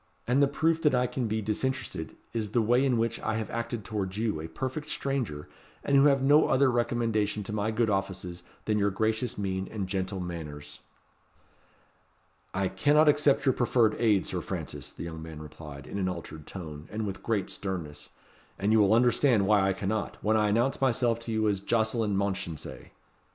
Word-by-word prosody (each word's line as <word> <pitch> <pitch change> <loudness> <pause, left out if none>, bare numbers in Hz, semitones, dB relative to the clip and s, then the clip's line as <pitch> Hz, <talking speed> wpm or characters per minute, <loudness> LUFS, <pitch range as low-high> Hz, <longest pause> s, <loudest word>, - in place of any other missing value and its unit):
And 125 +4 +3
the 140 - +6
proof 160 +3 +1
that 150 -5 +3
I 125 0 +3
can 125 -1 -2
be 110 0 -1
disinterested 110 -6 -2 0.2
is 110 -3 -3
the 120 - +4
way 120 +4 +3
in 130 -3 +2
which 115 0 0
I 110 - -1
have 110 -1 -3
acted 115 -2 -3
towards 100 -3 -3
you, 110 -8 -1
a 80 - -5
perfect 130 - -4
stranger, 125 - -2 0.4
and 140 - +1
who 140 +1 +7
have 135 -2 +4
no 145 +3 +5
other 130 0 +4
recommendation 115 -3 0
to 105 - -6
my 105 0 0
good 110 +1 +1
offices 95 -3 -2 0.2
than 105 -1 +1
your 100 0 +3
gracious 110 +4 -1
mien 95 -1 -2
and 105 -3 -3
gentle 95 0 -2
manners." 80 -5 -7 1.7
"I 95 0 0
cannot 150 +8 +4
accept 145 -1 +3
your 130 - +4
proffered 120 -3 +3
aid, 105 -5 +3
Sir - - -3
Francis," - - -6
the - - -8
young 80 -1 -6
man 80 -1 -8
replied, 75 -2 -10
in 100 - -5
an 95 -1 0
altered 80 -4 -7
tone, 80 -5 -8
and 110 +1 -2
with 95 -2 -5
great 110 -5 -1
sternness. 85 -7 -5 0.5
"And 100 +2 +1
you 110 - +5
will 105 +1 +5
understand 120 -2 +4
why 105 0 +4
I - - +2
cannot, 100 +2 -2
when 110 +1 +3
I 105 -1 +3
announce 120 +7 +1
myself 120 -3 +2
to 115 0 -6
you 110 -1 +1
as 100 -2 +1
Jocelyn 110 -1 +1
Mounchensey." 95 -5 -3
110 Hz, 190 wpm, -28 LUFS, 95-120 Hz, 1.7 s, who